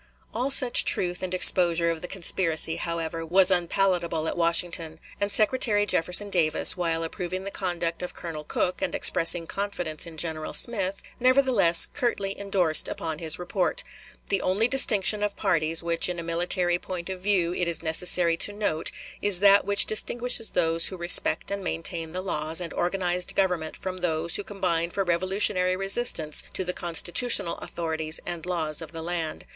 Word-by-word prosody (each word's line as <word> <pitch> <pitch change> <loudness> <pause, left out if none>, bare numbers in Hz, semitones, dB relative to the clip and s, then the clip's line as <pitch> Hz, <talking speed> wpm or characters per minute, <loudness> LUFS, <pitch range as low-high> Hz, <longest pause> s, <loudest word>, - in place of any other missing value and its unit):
" - - -36
All 250 +4 -3
such 255 -3 +4
truth 180 -1 0
and 185 -1 -5
exposure 175 -2 +4
of 165 -1 -7
the 180 - -7
conspiracy, 165 -3 +3
however, 165 -1 -5
was 185 +3 +2
unpalatable 175 -2 -1
at - - -4
Washington; 170 -1 0 0.2
and 200 0 -2
Secretary 210 0 +2
Jefferson 200 +2 +2
Davis, 165 -1 +4
while 165 -2 -3
approving 180 +2 -6
the 200 - -7
conduct 175 -4 -4
of 180 - -8
Colonel 160 -3 -7
Cooke 180 +4 -3
and - - -3
expressing 165 0 +4
confidence 175 -5 -4
in 165 -1 -12
General 155 -1 -2
Smith, 200 -5 +2 0.2
nevertheless 255 -9 +4
curtly 215 -7 -3
indorsed 190 -6 +1
upon 160 -1 -6
his 160 -2 +1
report: 330 - -3 0.5
"The 195 - -1
only 200 +5 +1
distinction 215 -6 +3
of 210 -1 -3
parties 165 -4 0
which 170 +1 0
in 180 - -5
a 170 - -6
military 175 +1 -1
point 175 -2 -8
of 185 -1 -8
view 185 -3 0
it 180 -1 -3
is 170 0 -2
necessary 170 +1 +2
to 205 - +4
note 205 -6 -2 0.3
is 205 -3 +4
that 200 0 +4
which 200 0 +3
distinguishes 235 +1 +1
those 165 -1 0
who 185 - -8
respect 175 +3 +1
and 200 -1 -5
maintain 165 -1 -3
the 185 +2 -6
laws 160 -3 -2
and 175 -2 -7
organized 180 0 -2
government 180 -5 -2
from 185 -1 -7
those 170 -1 -1
who 205 - -1
combine 180 -5 -3
for 195 +3 -3
revolutionary 185 +1 +2
resistance 195 -5 +1
to - - -2
the 180 0 -4
constitutional 175 +3 +2
authorities 160 -2 -3
and 175 0 -7
laws 160 -4 -3
of 160 0 -10
the 165 0 -8
land. 165 -2 -6
180 Hz, 170 wpm, -24 LUFS, 165-195 Hz, 0.5 s, such